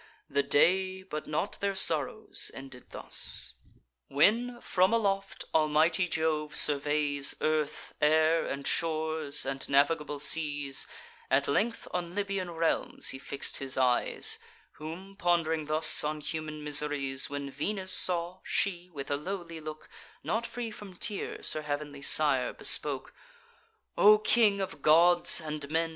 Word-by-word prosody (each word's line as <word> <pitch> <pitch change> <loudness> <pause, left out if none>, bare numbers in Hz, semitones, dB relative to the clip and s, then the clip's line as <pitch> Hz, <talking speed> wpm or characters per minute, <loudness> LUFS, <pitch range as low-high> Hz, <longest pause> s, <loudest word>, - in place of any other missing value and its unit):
The 140 - +2
day, 185 +6 +2
but 155 -5 -6
not 155 +6 -3
their 200 -1 -1
sorrows, 165 +3 0
ended 135 -2 -11
thus. - - -4 0.5
When, 235 - +2
from 185 -2 +1
aloft, 195 -3 -1
almighty 160 +3 +2
Jove 155 -2 -1
surveys 145 -1 +3
Earth, 155 -1 -2
air, 160 +2 +3
and 140 0 -5
shores, 160 -3 -1
and 135 0 -4
navigable 145 +1 +2
seas, 145 -2 +1 0.4
At 140 +2 +2
length 220 +11 -1
on 175 0 -4
Libyan 195 -3 -2
realms 165 -1 0
he 135 - -4
fix'd 140 0 -2
his 135 -1 -4
eyes: 125 -2 +1 0.3
Whom, 180 +6 -9
pond'ring 165 -4 0
thus 155 +1 +5
on 150 +1 -2
human 155 0 -5
miseries, 145 -2 -1
When 140 -1 -5
Venus 185 +7 -3
saw, 175 0 +1
she 180 -2 -2
with 145 -5 -7
a 140 - +1
lowly 170 0 -6
look, 155 0 -9 0.4
Not 230 +1 -2
free 240 -2 -5
from 205 -3 -11
tears, 205 +3 -3
her 155 - -4
heav'nly 145 -1 -5
sire 140 -3 +3
bespoke: 140 -3 0 0.8
"O 210 +1 +7
King 215 -2 +3
of 185 -6 -5
Gods 175 +3 +5
and 150 -3 -6
Men! 165 +1 0
155 Hz, 135 wpm, -29 LUFS, 145-185 Hz, 0.8 s, O